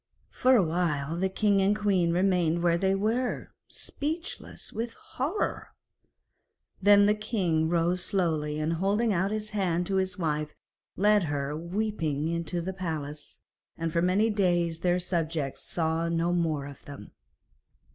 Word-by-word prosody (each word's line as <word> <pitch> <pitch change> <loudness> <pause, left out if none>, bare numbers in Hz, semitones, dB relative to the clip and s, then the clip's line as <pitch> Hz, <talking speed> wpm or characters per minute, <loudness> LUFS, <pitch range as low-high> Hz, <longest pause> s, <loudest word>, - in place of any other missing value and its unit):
For 255 +1 +4
a 215 - +5
while 160 -3 -1
the 190 +2 0
king 200 +1 +2
and 200 +2 +2
queen 190 -5 +2
remained 175 -2 +2
where 170 -1 +3
they 190 +1 +2
were, 225 +5 -1 0.2
speechless 320 +5 -5
with 230 +2 -3
horror. 305 +11 -3 1.1
Then 205 +1 +7
the 210 - +4
king 185 -7 0
rose 175 +1 +1
slowly, 160 -6 0
and 155 +2 0
holding 200 +6 +1
out 190 +2 +1
his 215 0 -3
hand 180 -4 0
to 195 +1 0
his 190 -1 0
wife, 150 -3 -2 0.4
led 205 -1 +4
her 145 -1 -2
weeping 165 -4 -2
into 170 0 -2
the 190 +3 -4
palace, 155 -5 -6 0.4
and 165 -1 -3
for 170 - +2
many 195 +5 +3
days 175 -5 +1
their 175 +1 +2
subjects 165 -5 -2
saw 165 0 -1
no 170 +1 +1
more 160 -5 0
of 140 -1 -11
them. 140 -1 -10
175 Hz, 145 wpm, -28 LUFS, 160-200 Hz, 1.1 s, Then